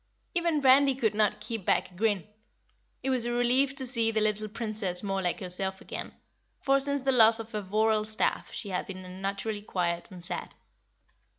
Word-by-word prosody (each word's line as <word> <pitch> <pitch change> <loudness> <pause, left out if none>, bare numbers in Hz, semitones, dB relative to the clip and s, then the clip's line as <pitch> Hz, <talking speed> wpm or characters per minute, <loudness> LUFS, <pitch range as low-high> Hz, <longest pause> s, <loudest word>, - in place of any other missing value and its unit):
Even 340 -4 +1
Randy 270 0 +5
could 230 -5 0
not 210 -1 +1
keep 225 -4 -5
back - - +1
a - - -19
grin. 205 -1 0 0.8
It 265 - 0
was 245 -2 0
a - - -1
relief 250 +3 +2
to 265 - -3
see 235 -3 +2
the 220 -1 0
little 215 0 0
Princess 215 -5 -2
more 195 -1 -1
like 175 -2 -1
herself 190 +1 -2
again, - - -7 0.5
for 275 -1 +2
since 280 0 -1
the 270 - +2
loss 225 -2 +8
of 225 0 -7
her 210 - -3
voral 215 +2 +1
staff 215 0 -1
she 205 - -5
had 180 -1 -3
been 185 -1 -8
unnaturally 195 +3 -4
quiet 175 -4 -2
and 180 -3 -10
sad. - - -5
215 Hz, 190 wpm, -28 LUFS, 195-250 Hz, 0.8 s, loss